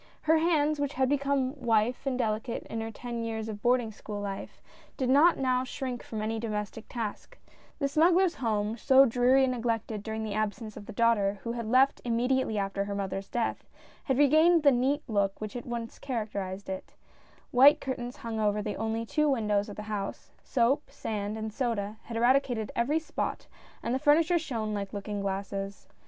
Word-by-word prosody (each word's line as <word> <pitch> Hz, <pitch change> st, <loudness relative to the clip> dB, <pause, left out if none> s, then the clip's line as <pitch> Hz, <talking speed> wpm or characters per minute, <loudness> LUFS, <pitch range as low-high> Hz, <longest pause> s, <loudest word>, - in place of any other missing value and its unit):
Her 315 Hz, +1 st, +4 dB
hands, 305 Hz, -2 st, +2 dB
which 285 Hz, 0 st, -1 dB
had 260 Hz, 0 st, +2 dB
become 280 Hz, -2 st, +1 dB
white 240 Hz, -3 st, +1 dB
and 260 Hz, -2 st, 0 dB
delicate 225 Hz, 0 st, -2 dB
in 225 Hz, -, -5 dB
her 225 Hz, -, -4 dB
ten 235 Hz, +1 st, -5 dB
years 220 Hz, -1 st, -3 dB
of 210 Hz, -2 st, -6 dB
boarding 245 Hz, -2 st, +2 dB
school 210 Hz, 0 st, -7 dB
life, 200 Hz, -1 st, -6 dB, 0.4 s
did 260 Hz, -3 st, 0 dB
not 315 Hz, +6 st, +6 dB
now 255 Hz, -1 st, +1 dB
shrink 255 Hz, -1 st, -4 dB
from 215 Hz, -2 st, -5 dB
any 225 Hz, +1 st, -2 dB
domestic 215 Hz, 0 st, -4 dB
task; 235 Hz, -, -5 dB, 0.4 s
the 280 Hz, -, 0 dB
smuggler's 345 Hz, +5 st, +4 dB
home, 215 Hz, -3 st, -1 dB
so 270 Hz, +3 st, +6 dB
dreary 250 Hz, +2 st, +4 dB
and 255 Hz, -1 st, +2 dB
neglected 225 Hz, -3 st, -2 dB
during 220 Hz, +1 st, -4 dB
the 215 Hz, -2 st, -3 dB
absence 215 Hz, +1 st, -3 dB
of 205 Hz, -, -10 dB
the -, -, -6 dB
daughter 205 Hz, -3 st, +2 dB
who 235 Hz, -, -3 dB
had 235 Hz, -2 st, -4 dB
left 260 Hz, +4 st, +4 dB
immediately 245 Hz, -1 st, +1 dB
after 200 Hz, 0 st, -1 dB
her 200 Hz, 0 st, -4 dB
mother's 195 Hz, 0 st, -4 dB
death, 235 Hz, -1 st, -2 dB, 0.4 s
had 265 Hz, -2 st, +1 dB
regained 315 Hz, +4 st, +5 dB
the 285 Hz, -, +7 dB
neat 265 Hz, +3 st, +1 dB
look 200 Hz, -4 st, 0 dB
which 215 Hz, -1 st, -5 dB
had 245 Hz, -, -6 dB
once 235 Hz, -1 st, -5 dB
characterised 205 Hz, -6 st, -4 dB
it; 190 Hz, 0 st, -6 dB, 0.6 s
white 280 Hz, +5 st, +7 dB
curtains 250 Hz, -2 st, -4 dB
hung 230 Hz, -3 st, -4 dB
over 210 Hz, -1 st, +1 dB
the 210 Hz, 0 st, -3 dB
only 225 Hz, +1 st, -2 dB
two 300 Hz, +5 st, +1 dB
windows 210 Hz, -5 st, +1 dB
of 205 Hz, -, -7 dB
the 210 Hz, -, -6 dB
house 210 Hz, -2 st, -5 dB
— -, -, -35 dB
soap, 265 Hz, +3 st, +1 dB
sand 210 Hz, 0 st, -4 dB
and 220 Hz, -1 st, -5 dB
soda, 220 Hz, -4 st, -2 dB
had 230 Hz, -1 st, -5 dB
eradicated 245 Hz, -2 st, +2 dB
every 260 Hz, +7 st, +1 dB
spot, 320 Hz, -, -3 dB, 0.4 s
and 235 Hz, -, -1 dB
the 260 Hz, -, +1 dB
furniture 325 Hz, +4 st, +4 dB
shone 230 Hz, -9 st, -3 dB
like 200 Hz, -1 st, -4 dB
looking 205 Hz, 0 st, -4 dB
glasses. 195 Hz, 0 st, -4 dB
230 Hz, 190 wpm, -29 LUFS, 210-265 Hz, 0.6 s, the